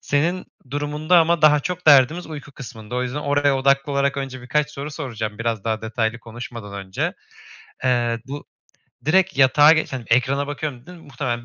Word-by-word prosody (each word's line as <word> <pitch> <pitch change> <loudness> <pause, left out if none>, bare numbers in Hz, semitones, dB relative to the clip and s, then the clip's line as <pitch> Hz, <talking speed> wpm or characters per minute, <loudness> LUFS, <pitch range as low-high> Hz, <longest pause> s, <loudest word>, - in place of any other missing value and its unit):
Senin 170 +6 0 0.3
durumunda 150 +4 +1
ama 165 -1 +2
daha 150 -1 +6
çok 180 +3 -5
derdimiz 150 +4 +5
uyku 145 -3 -9
kısmında. 110 -3 -9
O 125 - 0
yüzden 125 +3 -3
oraya 145 -1 +2
odaklı 140 +1 +2
olarak 140 0 +1
önce 130 -2 -5
birkaç 150 +4 0
soru 145 +1 -6
soracağım, 110 -8 -5
biraz 115 -3 -2
daha 110 -1 -2
detaylı 110 +1 -2
konuşmadan 115 -2 -9
önce. 150 - -2 0.7
Eee, 120 -2 +1
bu, 145 +2 -7 0.6
"Direkt 190 +4 +2
yatağa 145 +3 +7
geç 160 -3 0
hani, 125 -3 -5
ekrana 135 +4 +2
bakıyorum." 145 -3 -5
dedin, 180 0 -11
muhtemelen 120 -3 -4
140 Hz, 170 wpm, -22 LUFS, 120-150 Hz, 0.7 s, yatağa